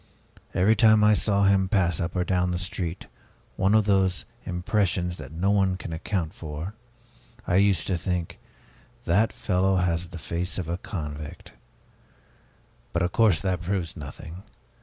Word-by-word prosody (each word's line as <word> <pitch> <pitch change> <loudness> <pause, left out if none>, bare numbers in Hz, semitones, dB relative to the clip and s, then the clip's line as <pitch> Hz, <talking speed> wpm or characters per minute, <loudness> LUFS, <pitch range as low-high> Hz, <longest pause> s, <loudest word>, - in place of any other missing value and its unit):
Every 105 +5 +4
time 110 0 +5
I 105 0 +6
saw 100 -1 +2
him 95 -1 +3
pass 90 -6 +2
up 85 +2 -3
or 90 - +1
down 90 0 +1
the 90 - -1
street 90 -1 -4 0.5
one 95 +3 +3
of 110 -2 +4
those 95 -3 +2 0.2
impressions 90 -1 0
that - - -9
no 90 +5 0
one 95 -2 +2
can 85 - -7
account 80 0 -2
for 80 +5 -6 0.7
I 90 - +2
used 100 -4 +3
to 90 -3 -1
think, 90 -2 -3 0.7
'That 100 +6 +3
fellow 95 0 +1
has 90 -1 0
the 85 0 -9
face 85 +2 -4
of 90 -4 -3
a 85 +2 -3
convict!' 75 -6 -7 1.4
But 85 - +1
of 90 - 0
course 105 -7 +3
that 95 -3 -1
proves 90 -2 -2
nothing. 80 +3 -9
90 Hz, 160 wpm, -26 LUFS, 85-100 Hz, 1.4 s, I